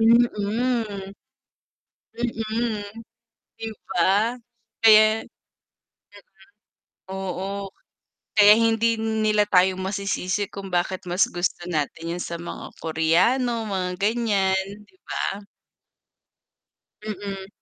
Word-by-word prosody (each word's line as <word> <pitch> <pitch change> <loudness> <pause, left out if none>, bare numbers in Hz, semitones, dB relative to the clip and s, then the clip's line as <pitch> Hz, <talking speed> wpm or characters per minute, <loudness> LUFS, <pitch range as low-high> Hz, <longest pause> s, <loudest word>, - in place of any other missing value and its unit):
Mm. 235 +2 +6 1.9
Mm, 225 -2 -2 0.8
'di 225 0 -4 0.2
ba? 200 +7 +2 0.4
Kaya 215 0 +6 1.8
Oo, 195 +1 -4 0.7
kaya 210 +1 +9
hindi 230 0 +2
nila 220 -1 +1
tayo 185 -2 +3
masisisi 195 0 -2
kung 195 -2 -8
bakit 180 +1 -1
mas 180 +1 +2
gusto 175 0 -3
natin 165 +1 -2
yun 180 - -4
sa 170 0 -5
mga 175 - -7
Koreano, 220 +9 +1
mga 185 -2 -2
ganiyan, 200 -3 +1 0.2
'di - - -27
ba? 200 +1 -4 1.6
Mm. 195 -2 -5
200 Hz, 85 wpm, -24 LUFS, 185-220 Hz, 1.9 s, kaya